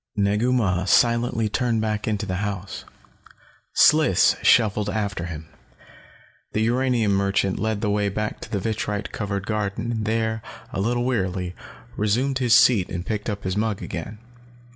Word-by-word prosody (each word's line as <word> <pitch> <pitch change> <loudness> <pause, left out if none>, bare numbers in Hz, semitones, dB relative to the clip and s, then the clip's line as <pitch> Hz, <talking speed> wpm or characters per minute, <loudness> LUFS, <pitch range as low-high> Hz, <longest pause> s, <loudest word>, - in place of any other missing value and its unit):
Negu 105 +4 +1
Mah 95 -8 +1
silently 115 +1 +2
turned 115 +1 0
back 110 -1 -2
into 105 -1 -1
the 95 -2 -3
house. 100 -2 -5 0.9
Sliss 150 - +5
shuffled 105 -2 +3
after 100 -5 -2
him. 80 -2 -7 1.1
The 110 - 0
uranium 120 -2 +1
merchant 100 0 +1
led 110 0 -1
the 105 - 0
way 105 0 +1
back 105 +2 -3
to - - -9
the 105 - 0
vitrite 105 0 -3
covered 100 -2 -3
garden 105 +1 -2
and 110 -2 -2
there, 110 0 -1 0.3
a 95 - -1
little 120 +3 0
wearily, 95 -7 -1 0.4
resumed 125 +6 0
his 120 -3 +4
seat 125 -7 +5
and 90 0 -5
picked 110 0 -3
up 105 -1 -4
his 95 0 -2
mug 105 -1 -1
again. 95 +6 -6
105 Hz, 155 wpm, -23 LUFS, 100-115 Hz, 1.1 s, Sliss